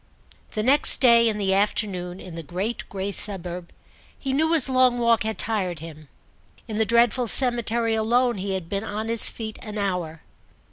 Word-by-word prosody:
The 215 - -2
next 275 +5 +4
day, 235 -3 +5
in 215 - -3
the 195 -2 0
afternoon, 195 -3 -2
in 180 - -10
the 165 - -6
great 185 +9 -5
grey 195 0 -4
suburb, 180 -4 +1 0.5
he 270 -1 -4
knew 315 +4 +1
his 310 -5 +3
long 255 -2 +3
walk 235 -1 +2
had 220 0 -3
tired 195 -6 -2
him. 155 -1 -11 0.6
In 215 -1 -4
the 220 - +1
dreadful 235 +1 +2
cemetery 235 -2 +2
alone 235 +2 +1
he 195 0 -3
had 185 -3 -6
been 200 +3 -3
on 215 +1 -5
his 230 -1 +3
feet 220 -2 -7
an 215 -1 -8
hour. 180 -6 -3
215 Hz, 180 wpm, -23 LUFS, 190-235 Hz, 0.6 s, day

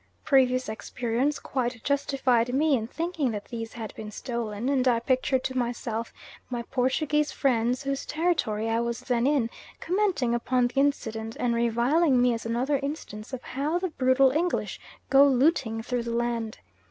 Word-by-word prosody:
Previous 255 -2 +3
experience 240 +5 -1
quite 245 -3 -3
justified 260 -4 +1
me 300 0 +3
in 225 -3 -2
thinking 325 -1 -2
that 210 -3 -4
these 225 -2 -6
had 225 -2 -6
been 215 -1 -7
stolen; 230 0 -4
and 270 -2 +2
I 240 -2 +4
pictured 260 +1 +1
to 260 - -3
myself 235 -2 -2 0.4
my 240 -2 -3
Portuguese 285 +4 0
friends, 245 -1 +1
whose 275 0 -3
territory 300 -10 0
I 225 0 +1
was 235 0 -2
then 245 0 +1
in, 270 -6 +1 0.3
commenting 360 - 0
upon 245 +1 +1
the 245 +3 -1
incident, 225 -6 -1
and 245 -1 +1
reviling 245 +5 +2
me 245 0 +4
as 230 0 -4
another 255 +5 0
instance 275 -7 -6
of 260 -2 -6
how 295 +6 -1
the 370 +1 -2
brutal 260 -2 +3
English 340 +5 -1 0.3
go 275 +1 +8
looting 265 -4 +2
through 245 0 -1
the 235 0 -3
land. 235 -2 -2
250 Hz, 165 wpm, -27 LUFS, 235-275 Hz, 0.4 s, go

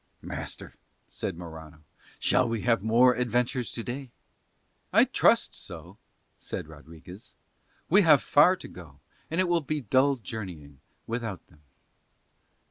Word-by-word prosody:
"Master," - - -6 0.4
said 90 - -4
Morano, 80 -2 -11 0.3
"shall 125 - +2
we 115 -2 -2
have 115 -4 +2
more 120 +4 +5
adventures 125 0 -1
to 115 - -5
day?" 130 +3 -6 0.8
"I - - +6
trust - - +3
so," - - -10 0.4
said - - -6
Rodriguez. 80 +5 -13 0.5
"We 195 +5 +5
have 155 -6 +5
far 155 +6 +5
to 185 - -11
go, 80 -6 -13 0.3
and 165 - -2
it 185 - +3
will 175 -1 +2
be 150 +1 -3
dull 130 +4 +3
journeying 90 - -8 0.3
without 115 -5 -5
them." 75 - -23
115 Hz, 130 wpm, -27 LUFS, 85-135 Hz, 0.8 s, I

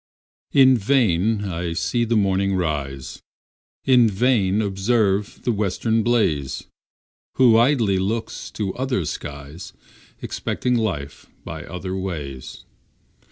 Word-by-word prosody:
In 130 -3 +6
vain 110 -3 +2
I 85 -2 -3
see 120 +7 0
the 115 0 0
morning 100 -1 +1
rise, 70 -6 -3 0.6
In 125 -4 +5
vain 105 -2 +2
observe 100 0 0
the 120 - +1
western 110 +2 0
blaze, 105 - 0 0.7
Who 120 -4 +5
idly 115 -5 +3
look 110 +4 -2 0.2
to 100 -3 -3
other 125 - -1
skies, 70 +4 -7 0.5
Expecting 125 - -2
life 95 -12 -2 0.2
by - - -7
other 95 +1 -5
ways. 75 -9 -6
100 Hz, 110 wpm, -22 LUFS, 90-115 Hz, 0.7 s, In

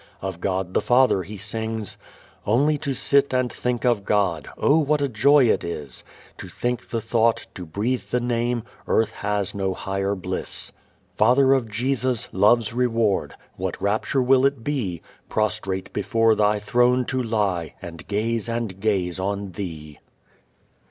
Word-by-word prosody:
Of 95 -2 -5
God 95 -1 -2
the - - +2
Father 125 -5 +4
he 105 +4 -8
sings: 110 +1 -4 0.5
Only 145 +8 +3
to 135 -1 -3
sit 140 +1 +2
and 125 -1 0
think 125 -1 -2
of 120 -5 +2
God, 95 -7 0
Oh 150 +3 +4
what 150 0 +2
a 140 - +1
joy 135 +4 +4
it - - +2
is! 75 -6 -6 0.4
To - - -8
think 120 0 -3
the 115 - -1
thought, 115 +1 +1
to 90 -3 -8
breathe 110 +10 -2
the 125 - +1
Name; 120 -1 -1 0.2
Earth 110 -1 +2
has 105 -2 -2
no 95 -2 -2
higher 100 +1 -2
bliss. 95 - -4 0.5
Father 130 +5 +5
of 125 -4 0
Jesus, 125 +2 -1
love's 105 +3 +3
reward! 115 -5 +1 0.2
What - - -3
rapture 110 +6 0
will 130 +1 +4
it 140 -4 +1
be, 115 - -2 0.3
Prostrate 105 -3 -2
before 115 -2 +2
Thy 105 0 +2
throne 125 +4 +2
to 130 +1 -1
lie, 105 -8 -1
And 85 -1 -10
gaze 110 +2 -1
and 115 -5 -3
gaze 95 -4 0
on 100 0 -3
Thee! 80 -6 -7
110 Hz, 155 wpm, -23 LUFS, 100-125 Hz, 0.5 s, Father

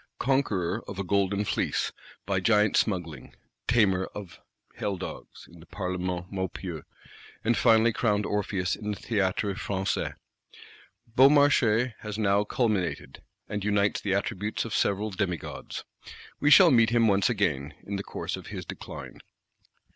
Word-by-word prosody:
Conqueror 110 -8 0
of 100 - -7
a 100 - -2
golden 100 +2 +1
fleece, - - -1 0.3
by 95 0 0
giant 105 +1 +3
smuggling; 85 -7 -1 0.3
tamer 100 -6 +3
of 100 -5 -8 0.3
hell 100 -2 -3
dogs, 95 - -9
in 85 - -15
the 80 - -15
Parlement 90 -2 -4
Maupeou; 95 -4 -4 0.6
and 120 +2 +2
finally 115 -1 +4
crowned 105 -3 +1
Orpheus 100 -2 -1
in 105 - -6
the 105 - -2
Théâtre 100 -1 0
Français, 95 -1 -2 1.0
Beaumarchais 130 -4 +5
has 105 -1 -6
now 100 -1 +2
culminated, 105 - -1 0.3
and 105 -1 -4
unites 105 0 +1
the 95 -1 0
attributes 105 +2 -2
of 115 - -5
several 105 +2 0
demigods. 95 -5 -4 0.6
We 145 - +3
shall 175 +2 +8
meet 115 -3 +5
him 115 -1 +3
once 100 0 +3
again, 80 - -1
in 100 0 -4
the 100 - -4
course - - -4
of - - -10
his - - -6
decline. - - -8
100 Hz, 140 wpm, -27 LUFS, 95-110 Hz, 1.0 s, shall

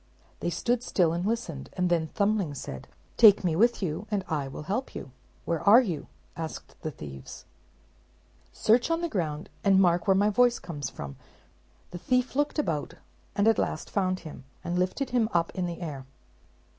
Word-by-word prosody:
They - - -1
stood 240 +7 0
still 175 -9 +2
and 170 +1 -2
listened; 195 - -3
and 180 -1 0
then 170 -2 +1
Thumbling 200 -4 0
said, 65 - -7 0.3
"Take 210 -4 +8
me 170 -3 +1
with 235 +3 +3
you, 180 +5 -3
and 200 -2 -1
I 150 -4 -1
will 135 - -7
help 210 - -3
you." 135 - -7 0.3
"Where 165 -2 -1
are 210 +4 +8
you?" 185 - -2 0.3
asked 160 -1 -7
the 155 - -3
thieves. 70 - -9 1.1
"Search 235 +6 +3
on 330 0 +1
the 340 - 0
ground, 160 - -2 0.2
and 195 -1 +5
mark 175 +1 +3
where 195 - +5
my 205 +2 +3
voice 245 +3 +4
comes 145 -7 -5
from," 70 - -7
replied - - -18
he. - - -32
The 175 - -6
thief 250 0 +1
looked 290 +2 0
about, 160 - -1 0.4
and 205 +1 +3
at 225 - +4
last - - -2
found 185 -2 0
him; 155 -5 -10 0.2
and 175 +1 -1
lifted 185 +10 -1
him 235 -3 +2
up 170 -1 +1
in 180 -1 -2
the 170 +1 -6
air. 140 -6 -6
185 Hz, 190 wpm, -28 LUFS, 160-220 Hz, 1.1 s, Take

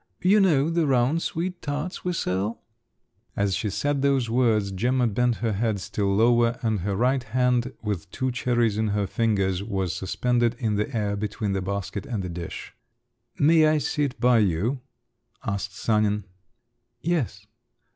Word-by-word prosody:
You 195 +4 +5
know 160 -6 +3
the 165 -2 +1
round 135 +5 +2
sweet 175 +2 -3
tarts 150 +4 -4
we 180 - -1
sell?" 100 - -2 0.7
As 100 -1 +1
she 105 - -1
said 140 +7 -1
those 135 -4 +1
words, 110 -5 +2
Gemma 125 +6 +1
bent 120 +2 +1
her 115 - +1
head 110 0 0
still 105 +1 -2
lower, 120 +2 +3
and 110 -3 +1
her 100 +2 -2
right 130 +5 +2
hand 125 +1 +1
with 105 -6 -3
two 130 +5 -2
cherries 120 -3 +1
in 110 - +1
her 100 - +1
fingers 100 -3 0
was 95 -4 -2
suspended 120 +4 0
in 110 -3 -1
the 105 +5 -1
air 105 -1 0
between 105 0 -3
the 95 -1 -1
basket 100 +1 -4
and 110 -7 -3
the 90 - -4
dish. 85 -1 -7 0.6
"May 155 +1 +5
I 155 0 +3
sit 145 -2 -1
by 125 -1 +4
you?" 105 - 0 0.6
asked 100 -2 -3
Sanin. 105 -2 +1 0.8
"Yes." 135 - -1
115 Hz, 160 wpm, -25 LUFS, 100-130 Hz, 0.8 s, You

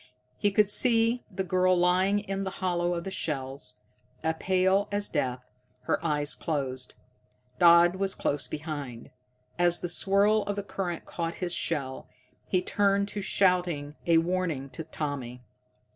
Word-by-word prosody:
He 205 - +3
could 205 +1 +3
see 230 +2 +3
the 190 -1 -3
girl 185 0 +2
lying 185 +3 +3
in 195 -1 -3
the 190 - -2
hollow 175 -2 0
of 170 - -4
the 195 - -5
shell, 135 -8 -2
as 125 -2 -8 0.7
pale 190 +2 +2
as 205 0 -1
death, 125 -4 -2 0.4
her - - -1
eyes 150 -2 0
closed. 130 -5 -4 0.6
Dodd 170 +1 +6
was 195 0 0
close 145 -1 0
behind. 145 -6 -6 0.5
As 175 -1 +2
the 175 - -3
swirl 200 +4 +3
of 205 - -2
the 205 - -3
current 185 -3 -4
caught 165 -1 -4
his 180 -2 -3
shell, 135 -7 -2 0.4
he 185 -1 +1
turned 200 0 +1
to 205 - -4
shout 180 -2 +2
a 150 +1 -1
warning 165 -5 -1
to 165 - -5
Tommy. 135 -6 -5
175 Hz, 150 wpm, -28 LUFS, 150-195 Hz, 0.7 s, Dodd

